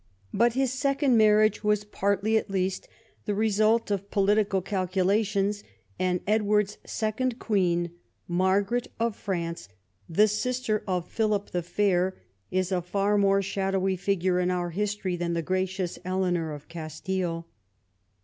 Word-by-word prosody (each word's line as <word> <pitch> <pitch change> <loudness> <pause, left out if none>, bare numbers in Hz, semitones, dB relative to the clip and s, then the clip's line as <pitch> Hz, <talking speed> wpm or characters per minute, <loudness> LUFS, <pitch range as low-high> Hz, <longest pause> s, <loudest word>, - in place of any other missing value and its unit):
But 235 +3 +3
his 260 0 +1
second 275 -1 +2
marriage 215 0 +4
was 210 0 +2
partly 200 +1 0
at 220 - +1
least 190 -1 -1 0.4
the 205 - -1
result 215 +1 +2
of 200 0 -2
political 200 0 +2
calculations; 195 +2 0 0.4
and 180 -1 +1
Edward's 210 -1 +1
second 230 +3 -2
queen, 175 -7 +1 0.4
Margaret 195 +6 +1
of 230 -2 0
France, 170 - -4 0.4
the 210 +6 +4
sister 215 +1 -1
of 180 -2 -1
Philip 210 -2 -1
the 175 - -1
Fair, 185 +1 +1 0.3
is 185 0 -1
a 180 -1 +1
far 200 +4 0
more 195 -1 +3
shadowy 195 -1 0
figure 185 -1 0
in 180 0 +1
our 175 -1 -1
history 200 0 -2
than 175 0 -2
the 170 -1 -1
gracious 185 0 -2
Eleanor 180 -3 0
of 145 -1 -9
Castile. 165 +1 -4
195 Hz, 135 wpm, -27 LUFS, 180-210 Hz, 0.4 s, marriage